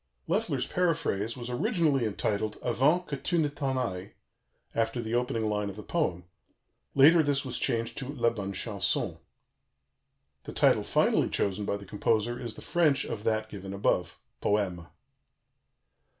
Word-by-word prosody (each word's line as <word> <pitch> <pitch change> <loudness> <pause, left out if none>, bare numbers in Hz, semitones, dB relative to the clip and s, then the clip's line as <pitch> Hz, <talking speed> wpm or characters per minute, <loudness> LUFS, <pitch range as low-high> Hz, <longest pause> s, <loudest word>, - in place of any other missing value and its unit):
Loeffler's - - 0
paraphrase 150 - 0
was 120 -1 -6
originally 135 0 +1
entitled 105 0 -1
Avant 140 +9 +2
que 145 - -3
tu 175 - -1
ne 155 -2 +3
t'en 140 -2 -2
ailles, 95 -7 -3 0.6
after 115 +1 0
the 115 -1 -3
opening 120 -2 0
line 105 -1 -1
of 95 - -7
the 105 - -8
poem; 90 - -1 0.7
later 155 +5 +7
this 145 -2 +1
was 125 -2 -1
changed 115 0 -1
to 135 - -4
La 120 -5 +1
Bonne 100 -4 -4
Chanson; 100 -2 -1 1.3
the - - -7
title - - +4
finally - - +2
chosen 100 +1 -1
by 100 - -1
the 100 - -11
composer 110 +4 0
is 115 -3 -5
the - - -10
French 150 -5 +2
of 105 - -5
that 110 -1 0
given 100 -2 -7
above 100 -2 0 0.2
Poème. 95 -5 0
115 Hz, 150 wpm, -29 LUFS, 100-135 Hz, 1.3 s, later